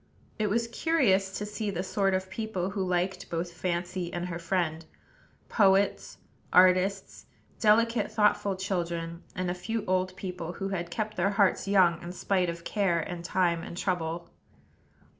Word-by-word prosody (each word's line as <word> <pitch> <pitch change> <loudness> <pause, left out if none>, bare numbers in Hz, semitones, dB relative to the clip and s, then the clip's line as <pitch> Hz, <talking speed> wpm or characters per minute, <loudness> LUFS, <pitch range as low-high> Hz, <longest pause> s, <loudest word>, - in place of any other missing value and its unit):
It 215 -1 +1
was 230 +3 +1
curious 220 - +1
to 210 - -3
see 210 0 -3
the 185 -2 -2
sort 195 0 +1
of 190 0 -2
people 195 -3 -3
who 195 -1 -2
liked 180 +1 -1
both 170 +1 -3
Fancy 175 +1 -3
and 175 0 -3
her 170 -1 -4
friend, 170 -2 -1 0.6
poets, 195 -1 +2 0.3
artists; 185 +2 +3 0.3
delicate, 230 +2 +3
thoughtful 210 -2 +2
children; 170 -3 -3
and 180 -1 -1
a - - -1
few 220 +4 -3
old 185 0 0
people, 180 -3 -5
who 195 +1 -4
had 175 -3 -3
kept 215 +2 -3
their 180 +2 +2
hearts 200 -1 +2
young 180 -4 +4
in 175 0 -7
spite 185 -1 0
of 170 0 -6
care 190 -5 +1
and 170 +1 -5
time 170 -1 +1
and 170 - -8
trouble. 170 -2 -2
185 Hz, 160 wpm, -28 LUFS, 175-200 Hz, 0.6 s, young